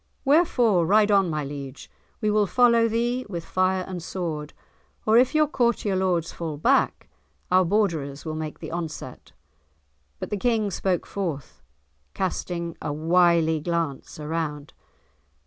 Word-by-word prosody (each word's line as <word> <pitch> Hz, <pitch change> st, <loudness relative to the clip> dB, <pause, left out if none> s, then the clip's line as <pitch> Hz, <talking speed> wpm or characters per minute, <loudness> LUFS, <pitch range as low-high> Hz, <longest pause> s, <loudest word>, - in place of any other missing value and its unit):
wherefore, 250 Hz, -, +3 dB
ride 210 Hz, +4 st, +4 dB
on, 195 Hz, -3 st, +4 dB
my 150 Hz, -2 st, -2 dB
liege; 140 Hz, -1 st, -8 dB, 0.3 s
we 215 Hz, -1 st, +1 dB
will 210 Hz, -1 st, +2 dB
follow 235 Hz, +1 st, +4 dB
thee 240 Hz, +3 st, -1 dB
with 170 Hz, -4 st, -5 dB
fire 185 Hz, 0 st, +1 dB
and 185 Hz, -2 st, -5 dB
sword; 160 Hz, -4 st, -4 dB, 0.5 s
or 220 Hz, -, +4 dB
if 250 Hz, +5 st, +4 dB
your 305 Hz, 0 st, +5 dB
courtier 235 Hz, -7 st, 0 dB
lords 180 Hz, -3 st, 0 dB
fall 160 Hz, -3 st, -5 dB
back, 260 Hz, -, +1 dB, 0.4 s
our 185 Hz, +1 st, +5 dB
Borderers 165 Hz, -8 st, -1 dB
will 155 Hz, -, -3 dB
make 155 Hz, -1 st, -5 dB
the -, -, -8 dB
onset." 165 Hz, -2 st, -6 dB, 0.9 s
But -, -, -7 dB
the 205 Hz, -, 0 dB
King 220 Hz, -1 st, 0 dB
spoke 185 Hz, 0 st, -1 dB
forth, 165 Hz, -9 st, -5 dB, 0.5 s
casting 170 Hz, -2 st, -3 dB
a -, -, -3 dB
wily 165 Hz, +1 st, +3 dB
glance 165 Hz, -3 st, -3 dB
around. 150 Hz, -1 st, -4 dB
180 Hz, 140 wpm, -25 LUFS, 160-215 Hz, 0.9 s, your